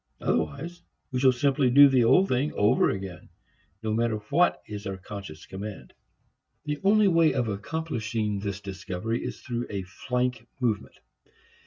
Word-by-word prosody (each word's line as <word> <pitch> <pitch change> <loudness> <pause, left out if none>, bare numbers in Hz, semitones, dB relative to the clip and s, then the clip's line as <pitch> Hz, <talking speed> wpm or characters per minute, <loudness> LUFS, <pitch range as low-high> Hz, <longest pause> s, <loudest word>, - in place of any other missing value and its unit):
Otherwise 170 +5 -2 0.3
we 130 - -1
shall 130 0 +6
simply 135 +1 +2
do 140 +3 +9
the 130 -3 +4
old 185 +12 +5
thing 135 +2 0
over 105 - +3
again, 95 -4 -6 0.5
no 110 -1 -1
matter 115 0 +1 0.2
what 175 +5 +3
is 105 0 -6
our 95 -1 -4
conscious 95 -4 -9
command. 95 -9 -8 0.7
The 150 -1 -2
only 210 +1 +5
way 165 -4 +4
of 125 -3 0
accomplishing 110 -3 -2
this 100 -1 -4
discovery 100 +3 -4
is - - -6
through 120 -1 -4
a 100 -2 -3
flank 125 +5 -2
movement. 115 -5 -1
120 Hz, 150 wpm, -27 LUFS, 100-140 Hz, 0.7 s, do